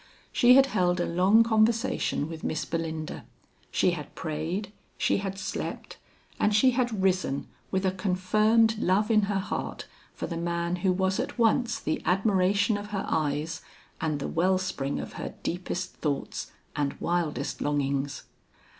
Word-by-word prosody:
She 245 +1 +6
had 270 0 +7
held 180 -7 +1
a 175 - +1
long 190 +6 +5
conversation 220 -8 +1
with 160 -1 -8
Miss 155 - -2
Belinda, 160 -2 -4 0.5
she 185 - +2
had 155 -4 -6
prayed, 165 +7 -3 0.2
she - - +2
had 195 -1 -4
slept 190 - -5 0.4
and 210 0 +3
she 255 +5 +5
had 240 -5 0
risen 185 -7 +1 0.2
with 190 0 0
a 190 - +3
confirmed 215 +4 +2
love 205 +4 +2
in 215 -1 +5
her 200 - +1
heart 195 - -4 0.3
for - - -4
the 165 - -4
man 170 +1 -1
who 185 +1 +2
was 190 +2 +1
at 255 - -3
once 235 0 +2
the 155 - -2
admiration 195 +2 +2
of 205 - -7
her 200 -2 -3
eyes 155 +1 -1 0.4
and 155 -2 0
the - - -3
well 185 +3 +2
spring 145 -7 -2
of - - -6
her - - -5
deepest 180 +1 -3
thoughts 145 -3 -3 0.2
and 145 -1 -1
wildest 170 -3 -1
longings. 140 -1 -1
185 Hz, 155 wpm, -27 LUFS, 165-210 Hz, 0.5 s, had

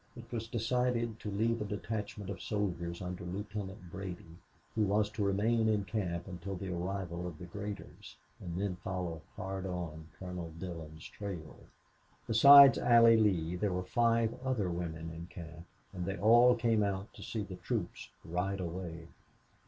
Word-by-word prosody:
It 120 -1 -9
was 115 -2 -3
decided 120 -1 0
to 105 - -5
leave 115 +3 0
a - - -1
detachment 105 -1 -4
of 90 - -7
soldiers 90 -5 -2
under 90 0 -5
Lieutenant 100 0 -6
Brady, 90 -3 -7 0.3
who 110 - 0
was 105 +1 +2
to 110 -1 -2
remain 110 +3 +2
in 105 -2 +2
camp 90 -4 -2
until 95 +1 -5
the 95 0 -4
arrival 90 -1 -3
of 85 -3 -7
the 90 - -8
graders, 100 +3 -7 0.2
and 85 0 -5
then 95 -2 -1
follow 90 -3 -4
hard 95 0 -4
on 80 -4 -5
Colonel 90 -3 -6
Dillon's 80 -4 -7
trail. 90 -7 -7 0.7
Besides 140 +4 +9
Allie 115 -1 +7
Lee 90 -6 +2
there 100 +2 0
were 90 0 -1
five 115 +2 +2
other 115 -9 0
women 80 -1 -4
in 85 +1 -8
camp, 85 -1 -10 0.3
and 90 -2 -4
they 95 +1 -2
all 120 +4 +6
came 115 -2 +2
out 100 0 -2
to - - -12
see 110 -2 -3
the 95 -2 -8
troops - - -3 0.2
ride 90 +4 -1
away. 85 -2 -5
95 Hz, 160 wpm, -33 LUFS, 90-110 Hz, 0.7 s, Besides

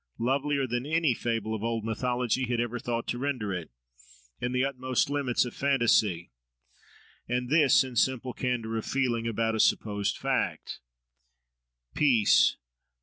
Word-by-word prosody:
lovelier 140 +3 0
than 120 0 -2
any 160 -1 +1
fable 115 -2 -2
of 110 -1 -4
old 115 -1 -2
mythology 125 +2 -1
had 120 -1 -1
ever 120 +1 -2
thought 115 0 -3
to 120 - -3
render 125 -8 -2
it, 85 -3 -5 0.7
in 125 - -2
the 125 +1 +1
utmost 130 0 -1
limits 135 -4 +1
of 120 - -7
fantasy; 115 - +1 1.0
and 125 +1 -2
this, 150 -4 +5
in 130 -2 -8
simple 130 +1 0
candour 115 -3 -2
of 110 - -3
feeling 120 -4 0
about 115 0 0
a 110 - -2
supposed 105 -2 +1
fact. - - -2 1.1
Peace! 125 -8 +4
120 Hz, 145 wpm, -28 LUFS, 115-130 Hz, 1.1 s, this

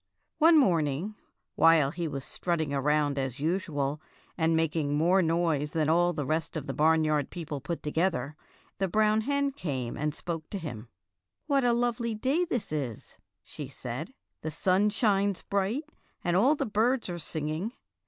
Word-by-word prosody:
One 325 +1 +7
morning, 170 - +2 0.4
while 160 -4 +5
he 170 0 -3
was 140 -3 -4
strutting 160 -5 -2
around 145 0 +1
as 135 0 -3
usual 150 -3 -1 0.3
and 165 -1 +2
making 155 -2 0
more 175 +5 +4
noise 165 -3 +1
than 155 -2 +1
all 175 +2 +4
the 150 -4 -3
rest 160 +3 -1
of 150 - -5
the - - -4
barnyard 155 -2 +2
people 155 -5 -5
put 170 +4 -4
together, 150 -3 0 0.4
the 195 - +1
brown 215 +3 +3
hen 280 +3 0
came 135 - -4
and 150 0 -2
spoke 165 -3 -5
to 200 - -4
him. 125 - -7 0.6
''What 280 -3 +2
a 240 -1 +4
lovely 235 -1 0
day 270 +11 +1
this 245 - -3
is," 135 -8 -5 0.2
she 145 - -8
said. 135 - -6 0.3
"The 155 - -3
sun 185 +6 +2
shines 200 -3 +1
bright, 200 +8 -1 0.4
and 175 0 +1
all 255 +11 +5
the - - -1
birds 230 +4 +1
are 175 -1 -4
singing. 155 +7 -3
165 Hz, 165 wpm, -29 LUFS, 150-205 Hz, 0.6 s, One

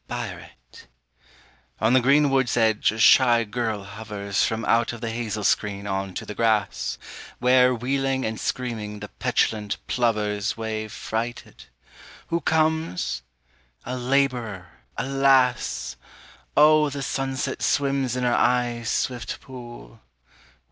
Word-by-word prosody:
Biuret - - -5 0.3
_) - - -13 1.0
On 110 +3 +3
the 130 - +6
green 140 +3 +4
wood's 130 -3 +1
edge 110 -3 +3
a 110 - -7
shy 120 +1 +6
girl 110 -2 -3
hovers 100 -1 -3
From 110 0 -1
out 115 0 +2
of 120 - -8
the 115 -2 -3
hazel 110 -2 -3
screen 100 0 0
on 95 -1 -3
to - - -5
the 105 - -6
grass, 110 -2 0 0.4
Where 125 0 +4
wheeling 135 +2 -1
and 110 0 -3
screaming 110 -5 -3
the 105 0 -8
petulant 105 -2 -1
plovers 105 -4 0
Wave 110 -1 -4
frighted. 115 - -5 0.6
Who 170 0 0
comes? 160 - 0 0.6
A 125 - -3
labourer, 125 -8 0 0.3
alas! 135 - +2 0.6
Oh 150 0 +6
the 140 0 -5
sunset 135 0 -2
swims 135 -3 +1
in 125 - -2
her 120 -1 +2
eyes' 120 -2 +1
swift 125 -2 -2
pool. 120 - -11
120 Hz, 125 wpm, -24 LUFS, 110-130 Hz, 1.0 s, the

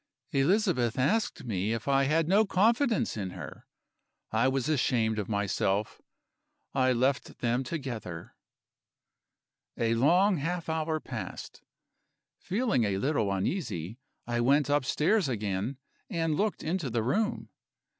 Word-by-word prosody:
"Elizabeth 145 - +2
asked 165 - +1
me 105 -2 -1
if 115 +2 -5
I 135 0 +3
had 155 +3 +2
no 200 +5 +5
confidence 225 +4 +2
in 100 -4 -3
her. - - -9 0.6
I 115 +3 +3
was 130 0 0
ashamed 120 -7 +1
of 100 - -4
myself; 100 0 -1 0.7
I 130 -1 +3
left 130 +2 0
them 120 +2 0
together. 120 - -6 1.4
"A 115 0 +1
long 175 - +4
half 165 +3 -3
hour 160 0 -1
passed. - - -7 0.8
Feeling 210 - 0
a 100 -2 0
little 110 -3 0
uneasy, 100 - -2 0.3
I 120 0 -1
went 140 +3 +3
upstairs 150 +5 +2
again 105 +2 -2 0.3
and 165 -5 0
looked 205 +6 -1
into 165 -3 -1
the 115 -1 -1
room. 215 - -1
135 Hz, 125 wpm, -29 LUFS, 115-170 Hz, 1.4 s, no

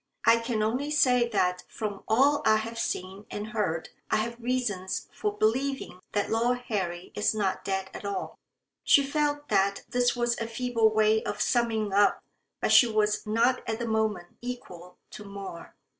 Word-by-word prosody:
"I 230 +1 +6
can 230 -2 -1
only 250 +7 -1
say 250 -5 +3
that 180 -4 0
from 210 -3 -5
all 280 +6 +4
I 220 - +5
have 225 +1 -3
seen 190 0 -4
and 210 +1 -5
heard 190 -8 -2 0.2
I - - +2
have 235 +2 -2
reasons 230 -7 -2
for 210 0 -3
believing 255 -2 0
that 205 -1 0
Lord 240 +2 +1
Harry 180 -4 -3
is 210 +1 +1
not 200 -3 -1
dead 190 -1 -2
at - - -8
all." 200 0 -4 0.4
She 280 - +5
felt 290 +1 -1
that 200 +1 +2
this 245 0 +2
was 240 -1 0
a 230 - -2
feeble 230 -1 +1
way 215 0 +3
of - - -4
summing 225 -4 +1
up, 205 0 +4 0.4
but - - +1
she 245 - +8
was 215 -1 0
not 235 +4 +2
at 220 - -1
the 235 0 -3
moment 220 -5 -1
equal 180 -8 -8
to 210 - -9
more. 200 -4 -9
220 Hz, 175 wpm, -28 LUFS, 200-240 Hz, 0.4 s, she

